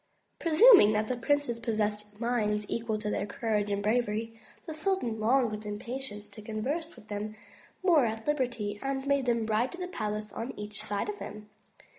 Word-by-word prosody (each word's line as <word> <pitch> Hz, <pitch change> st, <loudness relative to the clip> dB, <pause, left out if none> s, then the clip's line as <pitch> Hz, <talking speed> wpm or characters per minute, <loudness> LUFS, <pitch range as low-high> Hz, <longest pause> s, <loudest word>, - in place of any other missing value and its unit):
Presuming 335 Hz, -, +8 dB
that 215 Hz, 0 st, +1 dB
the 255 Hz, -, -1 dB
princes 245 Hz, -1 st, 0 dB
possessed 210 Hz, -2 st, -2 dB
minds 215 Hz, -3 st, 0 dB
equal 225 Hz, -2 st, -1 dB
to 210 Hz, 0 st, -3 dB
their 205 Hz, -, -1 dB
courage 210 Hz, -1 st, -1 dB
and 200 Hz, 0 st, -1 dB
bravery, 225 Hz, 0 st, 0 dB, 0.3 s
the 320 Hz, -, -5 dB
sultan 310 Hz, -, 0 dB
longed 240 Hz, +1 st, +3 dB
with 210 Hz, 0 st, -5 dB
impatience 210 Hz, 0 st, -5 dB
to 210 Hz, +1 st, -11 dB
converse 265 Hz, +10 st, -3 dB
with 210 Hz, -, -16 dB
them 210 Hz, +1 st, -4 dB, 0.5 s
more 320 Hz, -9 st, +5 dB
at 220 Hz, 0 st, -4 dB
liberty, 245 Hz, -8 st, -1 dB
and 270 Hz, 0 st, -2 dB
made 280 Hz, -2 st, +1 dB
them 230 Hz, -2 st, +2 dB
ride 220 Hz, +3 st, +1 dB
to -, -, -7 dB
the 360 Hz, 0 st, -4 dB
palace 215 Hz, -, -3 dB
on 235 Hz, +3 st, -5 dB
each 210 Hz, -1 st, -4 dB
side 205 Hz, -1 st, -2 dB
of 420 Hz, -1 st, -4 dB
him. 210 Hz, 0 st, -8 dB
225 Hz, 180 wpm, -30 LUFS, 210-265 Hz, 0.5 s, Presuming